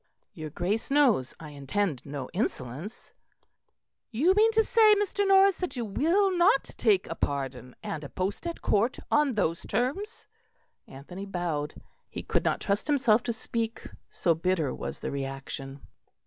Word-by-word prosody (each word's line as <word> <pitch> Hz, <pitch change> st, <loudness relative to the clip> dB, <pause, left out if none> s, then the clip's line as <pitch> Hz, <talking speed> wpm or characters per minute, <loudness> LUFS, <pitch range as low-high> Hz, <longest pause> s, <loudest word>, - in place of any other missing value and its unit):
"Your 155 Hz, -1 st, -7 dB
Grace 190 Hz, -, -2 dB
knows 255 Hz, -, +3 dB
I 155 Hz, -, -9 dB
intend 145 Hz, +2 st, -2 dB
no 140 Hz, -2 st, -5 dB
insolence." 165 Hz, -, -4 dB, 1.0 s
"You 290 Hz, +11 st, +3 dB
mean 435 Hz, +3 st, +4 dB
to 445 Hz, 0 st, +4 dB
say, 435 Hz, -1 st, +5 dB
Mr. 405 Hz, 0 st, 0 dB
Norris, 390 Hz, 0 st, +6 dB
that 360 Hz, -5 st, -3 dB
you 240 Hz, -2 st, -2 dB
will 355 Hz, -, +2 dB
not 345 Hz, -5 st, +4 dB
take 205 Hz, -5 st, +3 dB
a -, -, -4 dB
pardon 135 Hz, -5 st, -3 dB
and 155 Hz, -1 st, -4 dB
a 140 Hz, -, -7 dB
post 195 Hz, -, -3 dB
at 335 Hz, -, -6 dB
Court 220 Hz, +5 st, +2 dB
on 295 Hz, -5 st, +3 dB
those 170 Hz, -5 st, 0 dB
terms?" 275 Hz, -, -2 dB, 0.6 s
Anthony 180 Hz, +9 st, -9 dB
bowed; 165 Hz, -6 st, -3 dB, 0.3 s
he -, -, -6 dB
could -, -, 0 dB
not -, -, +1 dB
trust 200 Hz, +4 st, 0 dB
himself 255 Hz, -7 st, +3 dB
to 235 Hz, -, -2 dB
speak, 230 Hz, 0 st, -3 dB, 0.2 s
so 170 Hz, -, +1 dB
bitter 165 Hz, -4 st, 0 dB
was -, -, -6 dB
the -, -, -3 dB
reaction. 135 Hz, 0 st, -5 dB
205 Hz, 155 wpm, -28 LUFS, -, 1.0 s, Norris